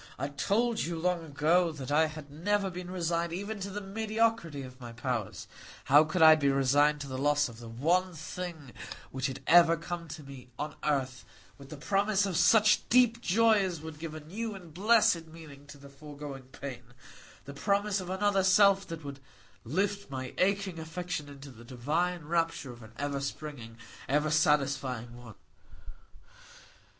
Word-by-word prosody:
I 140 +2 -3
told 220 +10 0
you 170 0 -3
long 175 0 0
ago 165 +3 +2
that 145 -3 -7
I 160 +2 +4
had 155 -2 -10
never 195 +5 0
been 180 0 -7
resigned 170 -2 -1
even 200 +4 -4
to 195 +1 -4
the 205 +1 -5
mediocrity 215 -6 -1
of 130 0 -12
my 120 -1 -8
powers; 120 -3 -4 0.4
how 145 +3 +6
could 165 +2 +1
I 160 0 +10
be 145 -3 +2
resigned 145 +2 +3
to 140 - -6
the 130 -1 -5
loss 145 +1 +2
of 115 -2 -11
the 120 - -10
one 170 +10 0
thing 160 -4 -7 0.4
which 130 0 -2
had 135 0 -7
ever 170 -1 +6
come 170 0 -6
to 155 0 -8
me 135 -2 -12
on 150 0 -4
earth 130 -4 -1 0.4
with 140 -1 -13
the 155 - -8
promise 200 +5 +1
of 190 -3 -3
such 215 +5 +4
deep 240 -1 +4
joy 225 +2 +4
as 180 -4 -2
would 160 -1 -9
give 160 -1 -6
a - - -6
new 210 +8 -5
and 175 -5 -12
blessed 195 -3 +3
meaning 155 -3 -13
to 145 - -12
the 140 0 -13
foregoing 140 -1 -9
pain,—the 125 +1 -11
promise 200 +5 0
of 180 - -8
another 195 0 +1
self 195 +1 +5
that 165 -2 -7
would 140 -1 -7 0.4
lift 200 - -2
my 130 -1 -5
aching 190 -2 +1
affection 165 -2 -5
into 140 -1 -11
the 120 -1 -14
divine 155 +8 -2
rapture 165 -4 -1
of 120 0 -13
an 110 0 -13
ever 145 -1 -2
springing, 135 -5 -6 0.3
ever 150 +2 +1
satisfied 140 -5 +1
want? 120 -3 -12
155 Hz, 175 wpm, -30 LUFS, 140-185 Hz, 0.4 s, I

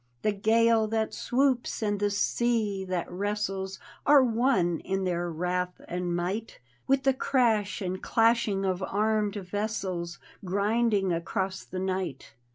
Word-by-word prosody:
The 210 - +3
gale 225 +2 +3
that 220 0 -1
swoops 255 -3 0
and 205 -1 0
the 205 0 +2
sea 205 -2 0
diat 180 -2 -1
wrestles 195 0 -3 0.3
Are 285 -2 +6
one 225 -8 +2
in 195 0 -2
their 175 -1 -1
wrath 180 +2 -2
and 175 0 -2
might 190 +6 -3 0.3
With 270 0 +3
the 270 - +4
crash 225 -7 +1
and 185 0 -3
clashing 225 -4 +2
of 185 -1 -1
armed 210 +1 0
vessels, 190 -3 -3 0.3
Grinding 200 0 +1
across 190 +3 -2
the 185 - -8
night. 185 -6 -3
200 Hz, 135 wpm, -28 LUFS, 185-225 Hz, 0.3 s, Are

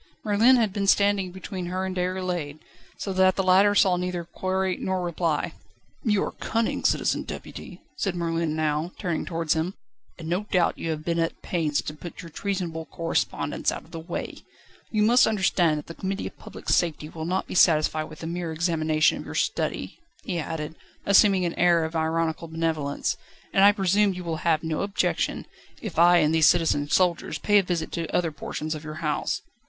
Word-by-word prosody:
Merlin 220 +5 +5
had 220 -6 +1
been 200 -1 -1
standing 200 -2 +3
between 185 0 -6
her 185 +1 -2
and 190 0 -4
Déroulède, 180 -5 -2 0.4
so 195 - -4
that 185 0 +4
the 195 - 0
latter 195 +2 +5
saw 185 -3 +4
neither 180 -1 -2
query 185 +2 -1
nor 185 -1 -2
reply. 170 -3 -1 0.5
"You 210 -4 +2
are - - -3
cunning, 230 0 -2
Citizen - - +1
Deputy," - - -9
said 195 -3 -1
Merlin 165 -2 -1
now, 155 +2 -1
turning 175 -5 -2
towards 165 -2 0
him, 165 +4 -2 0.4
"and 160 - -8
no 180 +5 -1
doubt 180 -5 +1
you 165 - -3
have 155 -1 -3
been 170 0 0
at 165 0 -1
pains 155 -5 0
to 150 - -5
put 170 +4 -9
your 165 - -10
treasonable 175 -4 -3
correspondence 165 0 -1
out - - -6
of - - -21
the 165 - -6
way. 170 +2 -5 0.5
You 215 -1 +1
must 240 +4 +5
understand 190 -6 +2
that 150 - -6
the 165 - -8
Committee 195 +3 -3
of - - -7
Public - - -11
Safety 160 -3 +1
will 160 0 -6
not 185 +3 -1
be - - -8
satisfied 155 -3 +4
with 155 +1 -11
a - - -3
mere 170 0 -3
examination 155 -1 +1
of - - -8
your - - -7
study," - - -2 0.2
he 180 -4 -2
added, 155 -1 -4 0.3
assuming 195 -2 +5
an 170 - -1
air 170 -2 +4
of 160 +1 -6
ironical 160 0 -1
benevolence, 160 -3 -1 0.4
"and 195 - +5
I 200 - +9
presume 200 0 +2
you 180 - -6
will 165 -2 -3
have 160 -1 +1
no 160 -1 -2
objection, 200 0 -1 0.3
if 195 -7 -4
I 175 +1 +7
and 155 -1 +3
these 160 -1 +5
citizen 155 -4 +2
soldiers 180 0 +1
pay 205 -1 +4
a - - +4
visit 175 -3 -3
to 165 -2 -3
other 170 -2 0
portions 155 +1 -4
of 155 0 -7
your 155 0 -7
house." 150 - -1
175 Hz, 195 wpm, -25 LUFS, 160-190 Hz, 0.5 s, I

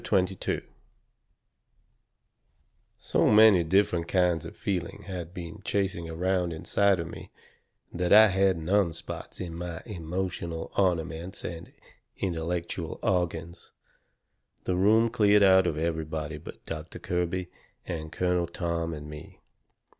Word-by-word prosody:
CHAPTER 95 -2 +2
XXII 95 - -2 2.4
So - - +1
many 105 -4 +7
different 85 -1 +2
kinds 90 -4 +2
of - - -9
feeling 90 -4 -3
had 90 -3 -6
been 85 -2 -8
chasing 95 -4 -1
around 90 +1 0
inside 100 +4 +2
of 85 - -3
me - - -9 0.6
that 90 0 -1
I 110 +1 +9
had 95 -1 +2
numb 90 +1 +1
spots 80 +1 -8
in 85 -3 -5
my 85 0 -6
emotional 85 -3 -4
ornaments 90 -1 -1
and 85 -1 -6 0.5
intellectual 85 -1 -3
organs. 85 -2 -2 0.9
The 90 - 0
room 110 +5 +4
cleared 105 -3 +5
out 95 -1 +6
of 80 - -1
everybody 80 -1 -3
but 80 - -11
Doctor 80 0 -6
Kirby 90 +1 -2 0.3
and 80 -2 -5
Colonel 90 0 0
Tom 85 -1 -2
and 75 0 -8
me. 75 0 -10
90 Hz, 125 wpm, -28 LUFS, 80-95 Hz, 2.4 s, I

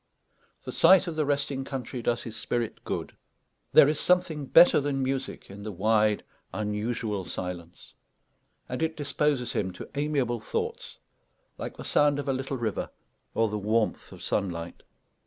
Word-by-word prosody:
The - - -5
sight 185 +3 +6
of 170 -3 -4
the 155 -2 0
resting 140 -1 0
country 135 -2 -5
does 120 +1 0
his 115 -2 -7
spirit 115 0 -3
good. - - -4 0.6
There - - +8
is 150 0 0
something 175 -6 +1
better 170 +3 +7
than 140 -1 -1
music 135 0 -3
in 100 +1 -9
the 105 +1 -5
wide, 105 +2 +2 0.3
unusual 105 -1 -2
silence; 90 -1 -6 0.7
and 125 - -4
it 160 0 -1
disposes 145 -3 0
him 95 -2 -1
to 90 - -8
amiable 140 -5 0
thoughts, 460 +2 -4 0.6
like - - -6
the - - -7
sound 145 -1 +3
of 145 - -4
a 135 - +2
little 135 +1 -3
river 115 -4 -2 0.5
or 115 - +3
the 105 0 -3
warmth 110 +2 0
of - - -11
sunlight. 85 -4 -2
125 Hz, 155 wpm, -28 LUFS, 105-145 Hz, 0.7 s, There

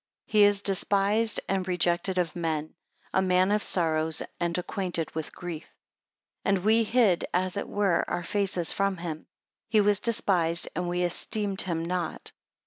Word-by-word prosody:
4 - - -27
He 210 -1 +6
is 205 0 +2
despised 200 +3 +2
and 190 -1 -1
rejected 180 +1 0
of 175 -2 0
men; 160 -3 -2 0.4
a 190 - +3
man 185 +1 +3
of 210 0 +2
sorrows 160 -4 +1 0.2
and 170 0 -1
acquainted 180 -3 -3
with 160 -1 -4
grief. 170 -3 -6 0.8
5 195 - +2
And 185 - -3
we 225 +1 +4
hid, 220 -6 +2
as 185 +1 0
it 200 - -4
were, 200 -4 +1
our 175 - -2
faces 185 -2 -1
from 195 -1 0
him; 165 -2 -6 0.4
he 220 - +4
was 205 -1 +3
despised, 175 -7 +1
and 180 -1 -2
we 180 0 0
esteemed 195 +3 -1
him 165 -3 -2
not. 175 -1 -3
185 Hz, 165 wpm, -27 LUFS, 170-200 Hz, 0.8 s, He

